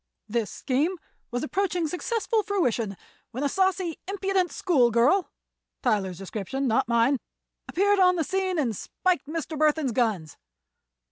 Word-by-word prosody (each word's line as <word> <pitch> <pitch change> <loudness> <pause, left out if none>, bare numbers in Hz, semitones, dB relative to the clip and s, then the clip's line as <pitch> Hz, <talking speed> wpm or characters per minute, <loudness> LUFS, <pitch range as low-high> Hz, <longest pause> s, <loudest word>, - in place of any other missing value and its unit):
This 225 -1 -1
scheme 300 +8 -1 0.3
was 245 +1 -3
approaching 360 0 0
successful 445 +6 0
fruition 245 - -1 0.3
when 255 +4 -4
a - - +3
saucy, 375 0 0
impudent 390 -2 0
schoolgirl—Tyler's 240 - +1
description, 210 +8 -3
not 225 -1 +2
mine—appeared 280 - 0
on 365 -1 +5
the 330 - +1
scene 375 +2 -1
and 245 -8 0
spiked 355 - -1
Mr. 320 0 -4
Burthon's 305 -2 +2
guns. 215 - -1
300 Hz, 120 wpm, -26 LUFS, 235-375 Hz, 0.3 s, on